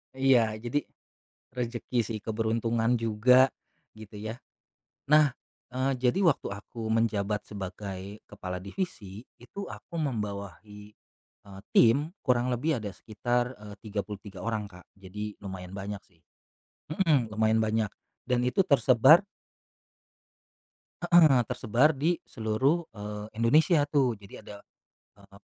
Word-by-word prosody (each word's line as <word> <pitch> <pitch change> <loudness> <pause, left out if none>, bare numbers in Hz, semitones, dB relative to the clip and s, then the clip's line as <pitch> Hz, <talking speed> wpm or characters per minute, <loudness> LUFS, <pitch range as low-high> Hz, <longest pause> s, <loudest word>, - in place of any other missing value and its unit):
Iya 125 -5 +3
jadi, 120 +5 0 0.8
rezeki 120 0 -2
sih 110 -1 -4
keberuntungan 115 +1 0
juga, 125 +3 +4 0.5
gitu 110 -1 -12
ya, 110 +2 -5 0.7
nah, 150 -3 +5 0.4
eee, 130 0 0
jadi 130 +10 +1
waktu 165 -7 +2
aku 110 +3 -8
menjabat 110 -2 0
sebagai 100 0 -7
kepala 90 -1 -6
divisi, 100 - -6 0.2
itu 200 +12 -8
aku 170 - -8
membawahi, 105 - -5 0.5
eee, 100 -1 -12
tim 145 - +4
kurang 125 -2 +2
lebih 145 +3 0
ada 105 -4 -6
sekitar, 120 +4 -2
eee, 105 -1 -10
33 100 -2 -6
orang, 110 -3 -2
Kak, 90 0 -15
jadi 105 +2 -7
lumayan 95 -1 -7
banyak 100 +1 -5
sih, 85 -3 -31 0.7
mmm, 155 - +2
lumayan 110 +1 +2
banyak, 110 -1 0 0.3
dan 125 -1 +1
itu 125 +10 +2
tersebar 135 +1 +6 1.8
Heeh, 160 -8 +5
tersebar 125 +5 +2
di 160 +5 0
seluruh, 125 +9 0 0.2
eee, 105 0 -6
Indonesia 145 +6 +4
tuh 135 -6 +1
jadi 100 -1 -12
ada, 105 - -10 0.6
eee, - - -18
115 Hz, 120 wpm, -28 LUFS, 105-130 Hz, 1.8 s, tersebar